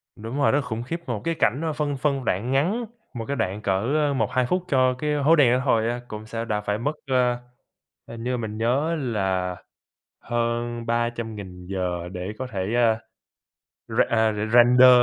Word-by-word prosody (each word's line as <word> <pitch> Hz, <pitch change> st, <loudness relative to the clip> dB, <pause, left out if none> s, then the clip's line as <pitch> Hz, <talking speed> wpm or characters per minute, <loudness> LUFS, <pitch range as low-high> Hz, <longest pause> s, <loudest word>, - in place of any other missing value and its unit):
Đúng 115 Hz, +5 st, -6 dB
rồi, 140 Hz, -, +4 dB
rất 140 Hz, -, +3 dB
là -, -, 0 dB
khủng 115 Hz, -2 st, -4 dB
khiếp. 165 Hz, +7 st, -4 dB
Một 115 Hz, -4 st, -2 dB
cái 165 Hz, 0 st, 0 dB
cảnh, 135 Hz, -1 st, +1 dB
a, 160 Hz, -, 0 dB
phân 145 Hz, -2 st, -1 dB
phân 135 Hz, -1 st, 0 dB
đoạn 110 Hz, +7 st, 0 dB
ngắn, 185 Hz, -, +1 dB, 0.3 s
một 115 Hz, -2 st, -5 dB
cái 140 Hz, -, -2 dB
đoạn 105 Hz, -3 st, -2 dB
cỡ 130 Hz, +10 st, +1 dB
1-2 125 Hz, +1 st, +1 dB
phút 180 Hz, +5 st, 0 dB
cho 130 Hz, -3 st, +3 dB
cái 150 Hz, +4 st, -2 dB
hố 150 Hz, +3 st, +4 dB
đen 130 Hz, -5 st, +5 dB
đó 125 Hz, -, +2 dB
thôi 115 Hz, -3 st, +3 dB
á, 120 Hz, +1 st, -2 dB
cũng 105 Hz, -1 st, -7 dB
sẽ 115 Hz, +1 st, -4 dB
đã 105 Hz, -2 st, -1 dB
phải 105 Hz, 0 st, -1 dB
mất, 130 Hz, +6 st, -1 dB, 0.2 s
ờ, 125 Hz, -1 st, +3 dB, 0.7 s
hình 115 Hz, 0 st, -8 dB
như 125 Hz, 0 st, 0 dB
mình 110 Hz, -3 st, -4 dB
nhớ 135 Hz, +8 st, +1 dB
là 95 Hz, -, -1 dB, 0.7 s
hơn 120 Hz, 0 st, -2 dB
300.000 115 Hz, -6 st, -3 dB
giờ 90 Hz, -2 st, -2 dB
để 90 Hz, +2 st, -4 dB
có 130 Hz, -, -3 dB
thể, 100 Hz, -1 st, -3 dB
à, 115 Hz, -2 st, +3 dB, 0.9 s
r -, -, -2 dB
à, 110 Hz, -1 st, +3 dB, 0.2 s
render 125 Hz, +1 st, +8 dB
120 Hz, 190 wpm, -24 LUFS, 110-135 Hz, 0.9 s, render